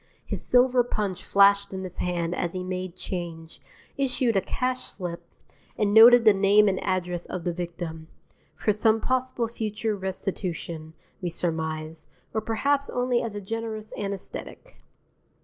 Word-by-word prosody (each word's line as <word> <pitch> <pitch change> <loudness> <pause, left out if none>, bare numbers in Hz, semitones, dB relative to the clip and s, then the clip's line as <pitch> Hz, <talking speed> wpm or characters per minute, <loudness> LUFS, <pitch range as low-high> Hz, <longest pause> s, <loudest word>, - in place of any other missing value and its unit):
His - - -4
silver 250 0 +4
punch 205 -6 -3
flashed 200 0 +4
in 190 0 -4
his 180 -1 -7
hand 175 -1 -1
as 175 -1 -2
he 185 -1 -3
made 185 -1 -4
change, 165 -4 -6 0.4
issued 255 -4 +1
a 195 - +4
cash 255 +6 -2
slip, 175 -3 -6 0.6
and 205 -1 +1
noted 230 +2 +9
the 215 - +8
name 200 +2 +5
and 190 -2 0
address 180 -2 -2
of 185 - -5
the 175 - -1
victim, 170 -2 -6 0.5
for 210 - +1
some 220 +1 +3
possible 255 -1 0
future 220 -1 -2
restitution, 180 -4 -4 0.3
we 180 - -1
surmised, 160 -2 -3 0.3
or 220 - 0
perhaps 275 +6 0
only 245 -1 +1
as 225 -3 -4
a 205 - -4
generous 220 +1 -5
anæsthetic. 200 - -6
195 Hz, 150 wpm, -26 LUFS, 175-225 Hz, 0.6 s, noted